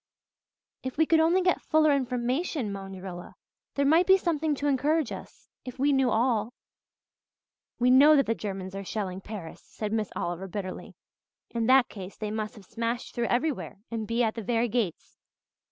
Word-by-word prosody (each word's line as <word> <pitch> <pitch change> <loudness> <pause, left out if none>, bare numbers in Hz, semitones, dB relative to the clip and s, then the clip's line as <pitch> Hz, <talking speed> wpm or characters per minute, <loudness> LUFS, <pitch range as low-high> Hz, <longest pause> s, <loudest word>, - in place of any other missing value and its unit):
"If 260 +1 -6
we 320 - +4
could 325 +1 +4
only 340 +4 +3
get 360 -1 +2
fuller 310 -1 +3
information," 255 - -1
moaned 195 -1 -7
Rilla. 175 -2 -8 0.4
"There 280 - +2
might 325 +5 +4
be 380 0 +7
something 320 -4 0
to 285 - -4
encourage 290 +1 +1
us - - -10 0.2
if 255 0 -8
we 280 +2 +2
knew 265 -2 +3
all." 230 0 +1 1.2
"We 250 0 +3
know 290 +4 +8
that 275 - +4
the 225 - +1
Germans 190 -3 -5
are 195 0 -5
shelling 190 -2 -4
Paris," 195 -6 -8
said 215 -1 -5
Miss 215 -3 0
Oliver 175 +2 -3
bitterly. 185 0 -6 0.6
"In 230 -1 -1
that 260 -1 +6
case 195 -2 -9
they 215 -1 -4
must 215 +2 -4
have 205 -3 -14
smashed 230 +3 -3
through 235 -1 -1
everywhere 245 - -1
and 220 -2 -3
be 235 +1 +1
at 220 -1 +1
the 230 - -5
very 230 +2 0
gates. 215 -7 -3
235 Hz, 180 wpm, -28 LUFS, 210-280 Hz, 1.2 s, know